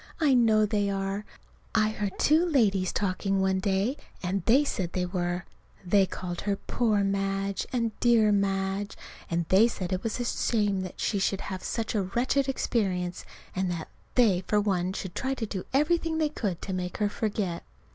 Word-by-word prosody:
I 300 -4 +4
know 220 -3 +5
they 205 -1 0
are. 195 +1 -2 0.5
I 215 -1 +4
heard 205 -2 -3
two 315 +3 +4
ladies 215 - +2
talking 195 0 0
one 190 0 +2
day, 200 +7 0 0.3
and 185 0 -1
they 265 +6 +5
said 185 -11 -2
they 180 -1 0
were. 180 0 -2 0.4
They 195 +1 +4
called 175 -1 -5
her 200 -1 0
"Poor 215 0 0
Madge," 195 0 -1
and 230 -3 0
"Dear 230 -3 +4
Madge," 195 0 0 0.3
and 170 0 0
they 200 +5 +6
said 185 -5 -4
it 185 - -1
was 225 +1 -3
a 245 - -1
shame 205 -5 +1
that 185 -1 -7
she 200 - 0
should 195 0 0
have 190 -1 -5
had - - -9
such 225 -2 -2
a 210 - +1
wretched 250 +8 0
experience, 185 -9 -1 0.3
and 185 0 0
that 170 -2 -4 0.3
they 210 -8 +4
for 210 - +3
one 185 -3 0
should 190 -2 -5
try 265 +1 -1
to 230 - -3
do 195 -3 -5
everything 320 +3 +2
they 310 -1 +2
could 200 - -3
to 190 - -4
make 180 -1 -3
her 210 - +2
forget. 205 -4 -2
200 Hz, 185 wpm, -28 LUFS, 190-225 Hz, 0.5 s, they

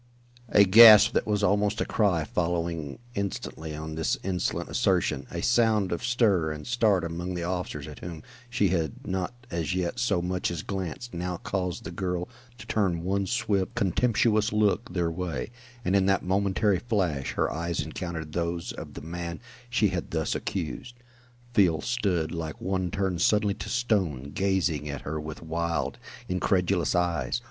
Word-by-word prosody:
A 100 - +7
gasp 110 +2 +9
that - - 0
was 105 -1 0
almost 105 +1 +2
a - - +1
cry 95 -7 +2
following 85 -3 -2 0.2
instantly 90 -6 -4
on 80 +1 -6
this 80 0 0
insolent 90 -2 -1
assertion - - +1
a - - -4
sound 110 -5 +3
of 85 - -2
stir 105 -10 +2
and 75 -1 -7
start 110 -6 +2
among 85 +2 -4
the 85 - -3
officers 90 0 -3
at - - -9
whom 85 -3 -7 0.3
she 105 -5 +2
had 80 -5 -2
not 95 +1 -2 0.2
as 85 +1 -1
yet 90 +5 -1
so 120 -7 +2
much 90 +1 -1
as 85 -3 -4
glanced, 95 +5 -5
now 90 +1 -3
caused 90 -2 -3
the - - -6
girl 90 -2 -2 0.3
to - - -10
turn 90 -6 0
one 95 +1 0
swift, 95 0 0
contemptuous 110 +2 +2
look 105 0 +1
their 85 -2 0
way, 90 +3 -4 0.3
and 95 - +2
in 95 -1 +3
that 95 -2 +2
momentary 100 +1 +2
flash 90 - -1
her - - 0
eyes 85 +1 -2
encountered 80 -4 -4
those 85 0 -2
of - - -9
the - - -7
man 85 +1 -5 0.3
she 110 -4 +2
had 90 -2 -3
thus 80 -1 -1
accused. 100 +7 -4 0.6
Field 85 -9 +3
stood 100 -9 0
like 80 -3 -5
one 95 -1 -1
turned 95 -2 -1
suddenly 105 0 +3
to - - -7
stone, 90 - 0
gazing 90 -6 0
at 70 -2 -5
her 80 +2 -4
with 80 +1 -7
wild, 85 +1 -2 0.3
incredulous 90 -1 +1
eyes. 85 - 0
90 Hz, 165 wpm, -27 LUFS, 85-100 Hz, 0.6 s, gasp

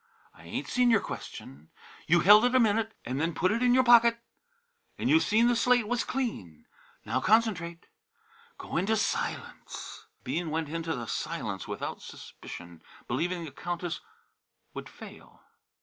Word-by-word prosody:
I - - -17
ain't - - -4
seen 250 -1 +2
your 225 -3 +5
question; 75 - -9 0.4
you 170 +1 +4
held 210 +5 +8
it 250 +1 +2
a - - +6
minute 225 -1 +1
and 130 +4 -2
then 165 +1 -1
put 185 +2 +2
it 230 +3 0
in 250 0 +4
your 260 - +5
pocket. 235 -1 +6 0.8
An' - - -1
you 320 - +6
seen 225 -3 +3
the 245 - +3
slate 245 -1 +3
was 245 +1 0
clean. 215 - -4 0.4
Now 130 - -1
concentrate; 190 - +1 0.7
go - - -5
into 195 +6 +1
the - - +2
Silence!" 215 - -4 0.2
Bean 170 -1 -2
went 160 -1 -2
into 165 0 -3
the 120 -2 -5
Silence - - -4
without - - -5
suspicion, 85 -1 -11 0.3
believing 175 0 -2
the 150 - -8
Countess 175 +1 -4 0.7
would - - -7
fail. - - -14
200 Hz, 160 wpm, -28 LUFS, 160-235 Hz, 0.8 s, held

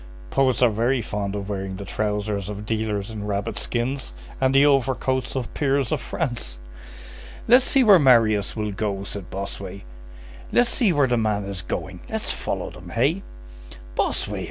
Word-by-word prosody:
Poets 130 -2 +3
are 120 - +5
very 120 +5 +1
fond 100 -1 -3
of 100 -1 -4
wearing 95 -2 -3
the 100 +1 -7
trousers 105 -1 -2
of 105 0 -6
dealers 110 -1 -2
in 105 -1 -5
rabbit 105 +1 -2
skins 130 +3 -2 0.3
and 130 0 +3
the 140 +1 +7
overcoats 130 -2 +1
of 130 -3 -3
peers 140 -3 +1
of - - 0
France." 120 - -3 0.9
"Let's 250 +2 +6
see 270 -2 +5
where 205 -5 +8
Marius 115 -7 +4
will 105 -2 -2
go," 100 -1 -2
said 100 -2 -6
Bossuet; 100 0 -6 0.7
"let's 245 0 +3
see 225 -7 +3
where 145 -4 +3
the 120 -2 +1
man 105 -3 0
is 100 -2 -5
going, - - -5
let's - - -2
follow - - -3
them, - - -11
hey?" 140 - +1 0.7
"Bossuet!" - - 0
110 Hz, 165 wpm, -24 LUFS, 100-135 Hz, 0.9 s, where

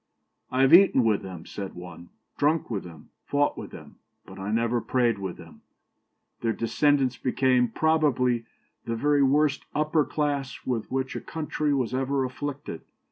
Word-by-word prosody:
'I 130 - 0
have 135 +2 +5
eaten 175 -8 +7
with 110 -3 +2
them,' 90 -4 -8
said 100 -2 -7
one, 90 -1 -10 0.3
'drunk 150 -1 +1
with 100 -4 -2
them, 85 -2 -13
fought 145 0 +1
with - - -7
them; - - -12 0.3
but - - -12
I 95 +1 -4
never 115 +1 +1
prayed 120 -4 +1
with 95 -2 -5
them.' - - -14 0.8
Their 115 -1 0
descendants 130 +2 +1
became, 125 0 +2
probably, 125 -4 +1 0.4
the 115 - -2
very 145 +4 +2
worst 140 +1 +2
upper 150 +1 +2
class 145 -4 -3
with 120 -4 -2
which 130 0 -2
a - - -4
country 155 -1 -2
was 130 -4 0
ever 135 +1 0
afflicted. 140 - -6
130 Hz, 160 wpm, -26 LUFS, 115-145 Hz, 0.8 s, eaten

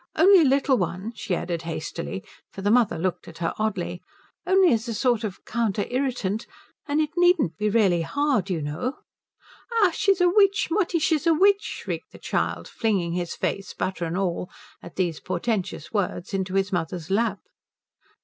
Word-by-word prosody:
Only 370 +2 +7
a - - +4
little 270 0 +3
one," 185 +5 -3
she 190 - -2
added 170 -1 -3
hastily, 170 +3 -5 0.3
for 195 - -8
the 205 - +2
mother 230 -7 +3
looked 180 +2 -2
at - - -11
her 170 -1 -1
oddly, 190 -5 -2 0.5
"only 375 -5 +5
as 225 +1 -1
a 230 - -3
sort 240 -1 +1
of 200 -3 -5
counter 220 -3 -1
irritant. 245 -6 -1 0.4
And 290 +1 +1
it 305 -1 0
needn't 350 - +3
be 210 +5 0
really 200 -6 +3
hard, 265 - 0
you 165 -5 -1
know 155 - -3 0.4
" 460 -3 -3
"Ach, 360 -4 +4
she's 395 -1 +2
a 355 - +5
witch 395 +2 +3
Mutti, 360 -1 +1
she's 315 0 +1
a 330 - +5
witch!" 400 +4 +4
shrieked - - -6
the - - -11
child, - - -2
flinging 195 -7 0
his 175 -1 -3
face, 195 - -3
butter 185 -2 -2
and 165 +2 -3
all, 180 -2 -1 0.3
at - - -11
these 175 -4 -1
portentous 185 -2 -3
words, 195 -2 -2
into 190 -1 -2
his 195 +1 +1
mother's 170 0 -3
lap. 210 0 +1
210 Hz, 180 wpm, -25 LUFS, 180-290 Hz, 0.5 s, Only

